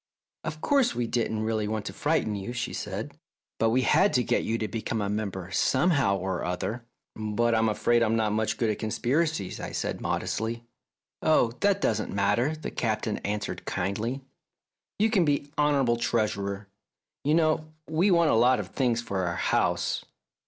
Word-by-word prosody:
"Of 155 0 -5
course, 275 -4 +2
we 120 - 0
didn't 115 -2 -1
really 110 -1 0
want 110 -1 -3
to - - -5
frighten 150 -7 0
you," 100 +4 -4
she 120 0 -3
said, - - -5 0.4
"but 115 +1 +3
we 130 +3 +2
had 195 - +4
to 125 - +3
get - - +1
you 115 - 0
to 110 - -2
become 110 0 -3
a 100 -1 -1
member 95 -3 -3
somehow 130 - +2
or 95 -1 -3
other." 105 +7 -3 0.2
" - - -63
But 110 +2 0
I'm 110 0 +3
afraid 120 +2 +2
I'm 115 -1 +2
not 110 -2 +1
much 110 0 0
good 115 -2 +1
at 105 - -4
conspiracies," 125 - -1
I - - -5
said - - -3
modestly. 115 +1 -2 0.6
"Oh, 155 -7 +3
that 200 0 +2
doesn't 110 -1 0
matter," 105 +9 +1
the 155 - -6
Captain 110 -2 -1
answered 105 0 -4
kindly. 110 +8 -2 0.4
" - - -64
You 215 +2 +2
can 195 -6 +4
be 145 -2 0
honourable 140 -5 +2
Treasurer. 105 -4 -1 0.6
You 150 +2 +3
know 155 -1 +2 0.2
we 160 +6 +2
want 170 -3 +4
a - - +3
lot 125 +2 +4
of 100 -2 -5
things 120 0 0
for 95 -5 -2
our 85 - -2
house." - - 0
115 Hz, 180 wpm, -27 LUFS, 105-145 Hz, 0.6 s, had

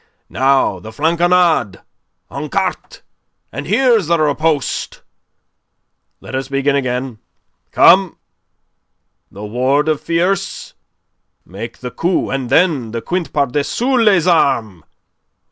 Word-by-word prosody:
Now 135 -7 +1
the 110 - -10
flanconnade 165 - +1 0.5
en 150 +2 -6
carte.... 195 - -3 0.5
And - - -6
here 255 -3 +3
is 185 - -6
the 170 0 +2
riposte.... 155 -1 -1 1.2
Let - - -12
us 135 0 -3
begin 140 +1 0
again. 125 -3 -3 0.5
Come! 185 -1 +4 1.1
The 100 +2 -9
ward 130 +7 0
of 155 -2 -1
tierce.... 180 +3 -2 0.7
Make 110 +6 -9
the 125 -1 -6
coupe, 175 +7 -1
and 135 -3 -3
then 155 -10 +2
the 115 +1 -5
quinte 180 +3 -3
par 145 -1 +1
dessus 230 - 0
les 195 -7 +3
armes.... 115 - +1
145 Hz, 115 wpm, -16 LUFS, 125-175 Hz, 1.2 s, Come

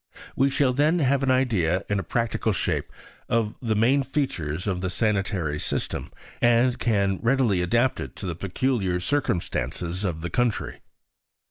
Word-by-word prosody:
We 135 +1 +3
shall 135 -1 +2
then 150 +6 +3
have 140 -3 +2
an 135 - +1
idea 100 -9 +2
in 100 0 0
a - - -3
practical 115 +5 0
shape - - -2 0.4
of 115 -2 +1
the 115 -3 0
main 125 +6 +3
features 90 - -2
of 95 -3 -1
the 95 - -1
sanitary 95 -7 0
system, - - -3 0.3
and 120 +1 +3
can 100 -4 +1
readily 115 -6 +2
adapt 120 +8 +2
it - - -6
to - - -7
the 90 - -2
peculiar 95 0 -1
circumstances 90 -6 -2
of 85 -5 -2
the 85 - -4
country. 120 -3 -1
110 Hz, 155 wpm, -25 LUFS, 90-130 Hz, 0.4 s, We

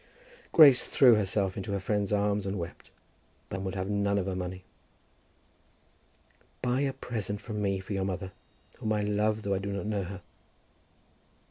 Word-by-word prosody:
Grace 140 -6 +7
threw 125 -3 +6
herself 100 -2 +1
into 100 +1 -4
her 100 - 0
friend's 100 +1 -1
arms 105 -1 +1
and 100 +1 -2
wept, 85 -1 -7 0.6
but 95 - -4
would 95 0 -4
have 95 0 -2
none 100 0 +1
of 95 - 0
her 95 -1 -2
money. 90 0 -5 2.0
"Buy 125 +2 0
a 140 -1 0
present 110 -6 -4
from 105 0 -5
me 100 -1 0
for 95 +2 -6
your 95 -1 -1
mother, 95 0 -4 0.5
whom 110 - -1
I 105 -1 0
love 105 +1 0
though 100 - 0
I 95 - 0
do 100 +1 -4
not 100 +1 -3
know 105 -3 -1
her." 95 0 -8
100 Hz, 170 wpm, -29 LUFS, 95-105 Hz, 2.0 s, Grace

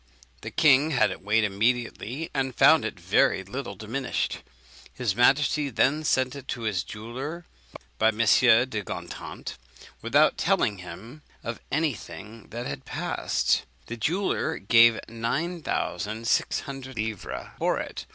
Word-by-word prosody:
The - - -6
king 150 -2 +4
had 125 -9 +3
it - - -7
weighed 110 +3 +2
immediately, 120 +7 -1
and 135 -3 -1
found - - +6
it - - -5
very 95 - +2
little 100 +1 -6
diminished. 115 +7 -3 0.5
His 120 -7 -2
majesty 140 +4 +3
then 140 +5 +2
sent 130 -1 +1
it 140 -2 -9
to 120 - -4
his 105 -6 0
jeweller 130 +10 -7 0.5
by 110 - +4
M. 110 -1 +1
de 115 0 +4
Gontant, 85 -2 -7 0.4
without - - +3
telling 100 -3 +1
him 115 +10 -10 0.2
of 115 -1 -5
any 155 0 +1
thing 110 +1 -11
that 120 +3 -5
had 65 - -5
passed. - - 0 0.2
The 115 - -6
jeweller 175 - -1
gave 115 +2 +5
nine 140 +10 -2
thousand 110 - -3
six - - +1
hundred 135 -1 -8
livres 110 -2 -4
for - - +1
it. - - -6
120 Hz, 140 wpm, -26 LUFS, 110-135 Hz, 0.5 s, found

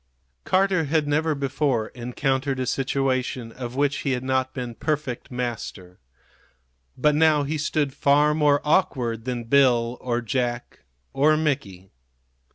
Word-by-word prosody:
Carter 185 -3 +2
had 150 0 +1
never 155 +1 +1
before 135 -4 -1
encountered 130 +2 -2
a 130 - -1
situation 130 -2 -1
of 120 0 -7
which 145 +1 +1
he 135 - -1
had 125 0 -3
not 130 0 0
been 125 -3 -5
perfect 145 -2 -3
master. 115 -7 -5 1.0
But 150 +3 +3
now 155 -1 +4
he 150 +2 -3
stood 145 -2 -1
far 145 +2 +3
more 150 -2 +3
awkward 125 - 0
than 125 -2 -3
Bill 120 -2 +3
or 120 -1 -1
Jack 120 0 -3 0.3
or 155 +3 +3
Mickey. 100 - -3
135 Hz, 135 wpm, -24 LUFS, 120-150 Hz, 1.0 s, now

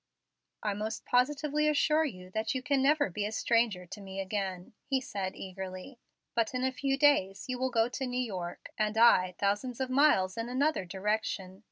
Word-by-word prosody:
"I 210 -2 0
most 215 +2 -4
positively 295 +4 +2
assure 305 +1 +3
you 185 -9 -7
that 220 +6 -1
you 255 - -2
can 280 -1 +2
never 290 - +3
be 205 +4 -2
a 210 - -2
stranger 225 -5 +1
to 200 +4 -9
me 195 0 -7
again," 190 -2 -3
he 270 -2 +1
said 195 -7 -4
eagerly. 190 +6 -7 0.3
"But 230 +2 0
in 255 - -1
a 260 - +2
few 270 +1 -1
days 235 -10 +3
you 255 -1 -3
will 260 0 +1
go 230 -2 +2
to 265 +1 -3
New 250 0 -3
York, 185 -8 -5
and 215 0 0
I 185 -6 +5
thousands 205 +5 -1
of 260 -1 -2
miles 255 -10 +3
in 230 +1 -3
another 270 -4 +1
direction. 190 0 -2
225 Hz, 190 wpm, -30 LUFS, 190-265 Hz, 0.3 s, I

